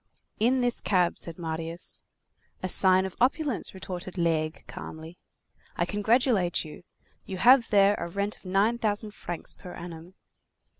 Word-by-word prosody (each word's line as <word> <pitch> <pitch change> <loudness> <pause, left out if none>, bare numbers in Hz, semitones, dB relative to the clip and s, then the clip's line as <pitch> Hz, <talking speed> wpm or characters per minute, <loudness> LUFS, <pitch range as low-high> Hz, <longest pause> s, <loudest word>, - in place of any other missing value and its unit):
"In 250 +4 +3
this 245 -1 +1
cab," 180 -3 +1
said 165 -2 -6
Marius. 165 0 -3 0.6
"A - - 0
sign 185 0 +4
of 190 - -6
opulence," 270 -4 0
retorted 185 0 -7
Laigle 160 -2 0
calmly. 160 +2 -9 0.6
"I 175 - +1
congratulate 210 -3 +2
you. 155 +5 -10 0.5
You 190 - -4
have 245 +4 +6
there 200 -1 +5
a 170 - -3
rent 200 +4 -2
of - - -22
nine 200 +5 +1
thousand 210 -1 0
francs 175 -4 -5
per 180 - -11
annum." 170 +1 -9
185 Hz, 145 wpm, -27 LUFS, 170-215 Hz, 0.6 s, have